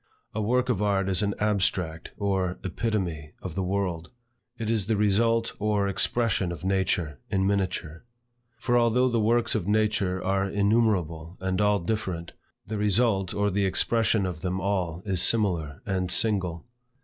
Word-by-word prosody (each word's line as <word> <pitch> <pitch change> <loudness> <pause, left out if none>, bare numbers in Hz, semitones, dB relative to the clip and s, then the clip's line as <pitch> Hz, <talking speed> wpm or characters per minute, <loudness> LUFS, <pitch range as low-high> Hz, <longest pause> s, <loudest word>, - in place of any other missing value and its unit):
A 110 - -2
work 125 +4 +1
of 110 -5 +1
art 100 -2 +1
is 95 -3 +2
an 100 -1 0
abstract 95 -5 0
or 95 -3 -1
epitome 90 -6 -2
of 90 - -5
the 95 - -2
world. 90 -3 -2 0.5
It 115 -2 -4
is 110 -3 0
the 110 -2 +1
result 115 +3 +2
or 105 -1 +1
expression 100 -2 0
of 85 -2 -7
nature, 90 -7 0
in 95 -2 +1
miniature. 90 -5 -2 0.5
For, 120 0 +2
although 120 +2 +3
the 120 -1 +1
works 115 +2 +2
of 100 -5 -2
nature 105 -3 +1
are 95 +1 0
innumerable 100 -6 +1
and 95 0 -1
all 105 0 +3
different, 90 -3 -3 0.3
the 105 0 -4
result 105 -2 +2
or 100 0 +1
the 100 +1 +1
expression 110 +1 +2
of 90 -4 -4
them 90 0 -2
all 90 -3 -2
is 95 -4 +2
similar 85 -10 +1
and 95 -2 -1
single. 95 -6 +1
100 Hz, 160 wpm, -26 LUFS, 90-110 Hz, 0.5 s, although